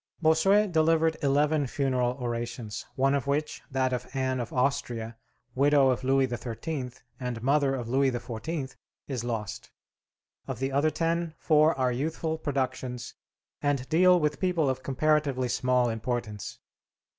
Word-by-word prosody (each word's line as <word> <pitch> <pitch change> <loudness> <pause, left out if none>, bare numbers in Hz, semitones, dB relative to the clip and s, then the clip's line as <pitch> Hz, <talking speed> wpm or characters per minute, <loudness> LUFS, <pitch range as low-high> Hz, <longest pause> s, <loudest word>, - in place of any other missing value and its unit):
Bossuet 190 +6 +4
delivered 160 0 +3
eleven 145 +1 +2
funeral 125 -2 0
orations, 120 -2 -4
one 135 +1 +2
of 140 -2 -1
which 145 +2 -1
that 130 -2 0
of 125 - -3
Anne 130 -1 0
of 120 - -4
Austria, 120 -3 -1 0.4
widow 140 +1 +4
of 130 - -2
Louis 135 +1 +3
XIII. 125 +3 -4 0.3
and 125 -3 -4
mother 140 0 +2
of 120 -3 -4
Louis 135 +3 +3
XIV, 130 +4 -4 0.3
is 130 -4 -3
lost. 110 -5 -4 0.8
Of - - -4
the 135 +3 -2
other 140 +3 +3
ten, 165 0 -1
four 155 -1 +3
are 130 -1 +2
youthful 160 +5 -2
productions 130 -4 -3 0.5
and 140 -3 0
deal 180 +2 +5
with 150 -1 0
people 170 -7 +1
of 130 0 -5
comparatively 140 -2 +1
small 125 0 +2
importance. 115 -2 -4
135 Hz, 140 wpm, -28 LUFS, 125-155 Hz, 0.8 s, deal